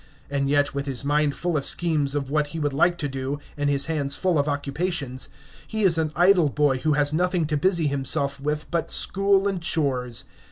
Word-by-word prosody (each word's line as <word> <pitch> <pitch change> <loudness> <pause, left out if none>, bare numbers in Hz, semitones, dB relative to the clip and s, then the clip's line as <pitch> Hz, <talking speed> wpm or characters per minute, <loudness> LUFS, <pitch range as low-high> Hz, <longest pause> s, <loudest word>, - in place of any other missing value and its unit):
And 140 -1 0
yet, 145 0 +2
with 140 0 -4
his 135 0 -3
mind 145 0 +1
full 175 -1 -2
of 140 - 0
schemes 150 -5 +1
of 140 -2 -3
what 150 -1 +1
he 160 +2 -6
would 145 -2 -1
like 175 +5 +2
to 150 - -2
do, 135 +1 -4 0.2
and 145 -1 -1
his 140 -1 +3
hands 145 -3 -1
full 180 -5 +1
of 145 - 0
occupations, 145 -1 -3 0.4
he 220 -1 -2
is 170 -4 +4
an 155 -1 -1
idle 175 -2 +4
boy 140 -2 +1
who 155 +2 +1
has 145 0 +1
nothing 180 0 +1
to 150 0 -2
busy 170 +2 +1
himself 140 0 0
with 150 +1 -2
but 170 -2 -1
school 195 0 +2
and 195 -3 -2
chores! 130 -7 -1
150 Hz, 210 wpm, -24 LUFS, 140-170 Hz, 0.4 s, is